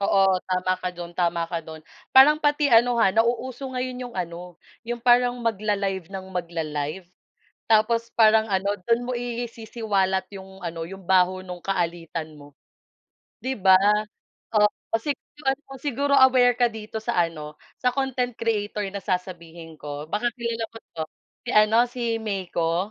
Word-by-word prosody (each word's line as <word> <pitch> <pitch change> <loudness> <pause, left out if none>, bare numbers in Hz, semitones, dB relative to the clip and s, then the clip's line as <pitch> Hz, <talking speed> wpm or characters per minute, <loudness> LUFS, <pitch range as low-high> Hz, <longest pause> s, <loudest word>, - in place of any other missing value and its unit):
oo 200 0 +1 0.3
tama 185 0 +1
ka 185 - -2
do'n 175 0 -7
tama 170 -1 +1
ka 170 - -1
do'n 160 -1 -9 0.3
parang 295 +3 +8
pati 295 0 +2
ano 240 +1 +5
ha 225 -5 +4
nauuso 245 +4 0
ngayon 255 0 -4
'yong 240 - -15
ano 175 0 -5 0.3
'yong 240 -1 -4
parang 245 0 +4
mag-la-live 200 -4 -1
ng 190 -1 -7
mag-la-live 165 -1 -3 0.6
tapos 230 +1 +2
parang 220 -1 +5
ano 200 0 0
do'n 235 0 +2
mo 245 0 -3
isisiwalat 220 -5 -2
'yong 190 -1 -11
ano 165 -2 -4
'yong 195 +3 -9
baho 185 0 +3
nung 180 -1 -7
kaalitan 170 -4 -3
mo. 145 0 -15 0.9
'Di 260 -1 -3
ba? 190 -1 +6 0.8
Oo 210 -1 +5 0.3
siguro 295 +1 -6
ano, 270 +2 -4 0.2
siguro 285 0 -1
aware 255 -2 +6
ka 245 -1 +3
dito 220 0 -7
sa 200 -7 +2
ano 150 -2 -9 0.2
sa 250 - +4
content 260 -2 -1
creator 210 -2 -1
na 200 - -4
sasabihin 170 -3 -5
ko 145 0 -6
baka 210 +9 -1
kilala 235 -1 -2
mo 225 - -11 0.2
'to 160 -1 -3 0.4
si - - -4
ano 215 +1 +5
si 245 0 -6 0.2
Meiko. 180 -5 -1
205 Hz, 150 wpm, -24 LUFS, 180-240 Hz, 0.9 s, parang